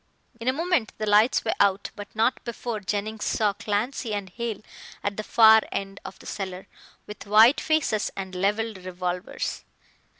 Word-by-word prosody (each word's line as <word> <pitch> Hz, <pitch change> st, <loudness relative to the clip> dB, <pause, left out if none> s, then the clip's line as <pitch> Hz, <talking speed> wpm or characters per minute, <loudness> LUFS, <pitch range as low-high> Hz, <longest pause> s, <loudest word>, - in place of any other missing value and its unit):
In 230 Hz, -, -7 dB
a -, -, +5 dB
moment 330 Hz, -6 st, 0 dB
the 215 Hz, -, -2 dB
lights 210 Hz, +4 st, +4 dB
were 220 Hz, -, +1 dB
out, 200 Hz, 0 st, +2 dB
but 205 Hz, +1 st, -10 dB
not 225 Hz, +4 st, +1 dB
before 235 Hz, -2 st, -4 dB
Jennings 210 Hz, +2 st, -3 dB
saw 210 Hz, -2 st, +1 dB
Clancy 220 Hz, +2 st, -2 dB
and 195 Hz, -2 st, -5 dB
Hale 230 Hz, -1 st, -4 dB, 0.4 s
at 205 Hz, 0 st, -1 dB
the 215 Hz, -, -4 dB
far 220 Hz, 0 st, +7 dB
end 195 Hz, 0 st, -4 dB
of -, -, -9 dB
the -, -, -16 dB
cellar, 190 Hz, -2 st, -5 dB, 0.4 s
with 210 Hz, -1 st, -10 dB
white 220 Hz, +6 st, +6 dB
faces 310 Hz, -9 st, +1 dB
and 190 Hz, -1 st, -5 dB
levelled 205 Hz, +3 st, -1 dB
revolvers. 180 Hz, 0 st, -4 dB
210 Hz, 165 wpm, -25 LUFS, 195-225 Hz, 0.4 s, far